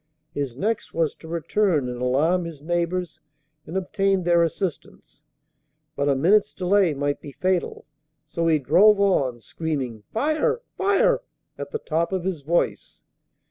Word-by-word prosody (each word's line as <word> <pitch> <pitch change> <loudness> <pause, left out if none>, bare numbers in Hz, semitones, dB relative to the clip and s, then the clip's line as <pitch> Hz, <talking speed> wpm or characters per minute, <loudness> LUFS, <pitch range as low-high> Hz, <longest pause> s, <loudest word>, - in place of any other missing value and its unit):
His 135 -4 -4
next 220 +8 -2
was 165 -2 +1
to 160 - -13
return 170 -2 0
and 125 0 -5
alarm 155 +8 +2
his 165 -4 -8
neighbors 175 +2 -2 0.5
and 180 - -3
obtain 195 0 0
their 170 0 +4
assistance. 170 0 -4 0.7
But 140 0 0
a 140 - +3
minute's 200 +9 +3
delay 185 -3 +2
might 145 +1 -2
be 140 - -10
fatal: 185 +2 -1 0.4
so 165 +2 -2
he 160 -1 +4
drove 200 - +5
on, 135 -12 +1
screaming, 135 -7 -4
"Fire! 310 - 0
fire!" 445 +6 +2 0.3
at - - -7
the 450 - -3
top 170 - -1
of 185 -2 -1
his 180 -5 -3
voice. 170 +5 -1
170 Hz, 145 wpm, -24 LUFS, 145-195 Hz, 0.7 s, drove